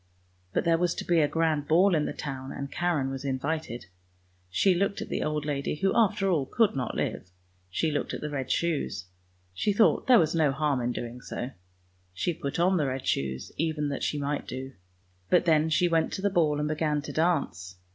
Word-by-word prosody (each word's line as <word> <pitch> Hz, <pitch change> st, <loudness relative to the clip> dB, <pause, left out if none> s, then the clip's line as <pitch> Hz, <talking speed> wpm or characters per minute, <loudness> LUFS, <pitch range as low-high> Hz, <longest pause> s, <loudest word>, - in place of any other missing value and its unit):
But -, -, 0 dB
there 165 Hz, -1 st, +3 dB
was 175 Hz, -1 st, +1 dB
to -, -, -5 dB
be 170 Hz, -1 st, +3 dB
a 150 Hz, -, +4 dB
grand 155 Hz, -2 st, 0 dB
ball 180 Hz, +5 st, +5 dB
in 150 Hz, -2 st, +2 dB
the -, -, -2 dB
town, 135 Hz, -2 st, -6 dB
and 140 Hz, 0 st, -6 dB
Karen 165 Hz, -7 st, 0 dB
was 135 Hz, 0 st, -5 dB
invited. 140 Hz, -1 st, -3 dB, 0.6 s
She 185 Hz, -, +3 dB
looked 200 Hz, +3 st, 0 dB
at -, -, -6 dB
the -, -, -2 dB
old 150 Hz, -1 st, -1 dB
lady, 140 Hz, -1 st, -1 dB
who 195 Hz, +5 st, 0 dB
after 210 Hz, -3 st, +3 dB
all 155 Hz, -8 st, +1 dB
could 225 Hz, -8 st, +2 dB
not 125 Hz, -3 st, -2 dB
live; -, -, -3 dB, 0.4 s
she 155 Hz, -, 0 dB
looked 145 Hz, -, -2 dB
at -, -, -5 dB
the 150 Hz, -, -4 dB
red 135 Hz, -3 st, -3 dB
shoes; 150 Hz, -, -1 dB, 0.5 s
she 205 Hz, -, 0 dB
thought 215 Hz, +2 st, +3 dB
there 255 Hz, -2 st, +8 dB
was 160 Hz, -2 st, +3 dB
no 155 Hz, -4 st, +3 dB
harm 140 Hz, -2 st, 0 dB
in 120 Hz, +1 st, 0 dB
doing 120 Hz, +1 st, -6 dB
so. 125 Hz, +1 st, -5 dB, 0.6 s
She 175 Hz, -, 0 dB
put 140 Hz, -1 st, -4 dB
on 180 Hz, +2 st, +3 dB
the 150 Hz, -4 st, +1 dB
red 130 Hz, 0 st, -3 dB
shoes, 65 Hz, -1 st, -2 dB
even 155 Hz, -2 st, -1 dB
that 140 Hz, -, -3 dB
she 150 Hz, -, -1 dB
might 145 Hz, 0 st, -2 dB
do; 130 Hz, +1 st, -6 dB, 0.6 s
but -, -, +4 dB
then 160 Hz, -1 st, +3 dB
she 170 Hz, +3 st, +3 dB
went 165 Hz, -1 st, +1 dB
to 190 Hz, -, -4 dB
the 200 Hz, -, +2 dB
ball 155 Hz, -5 st, +2 dB
and 150 Hz, -, 0 dB
began 150 Hz, -1 st, 0 dB
to -, -, -6 dB
dance! 145 Hz, -, 0 dB
150 Hz, 215 wpm, -28 LUFS, 135-170 Hz, 0.6 s, there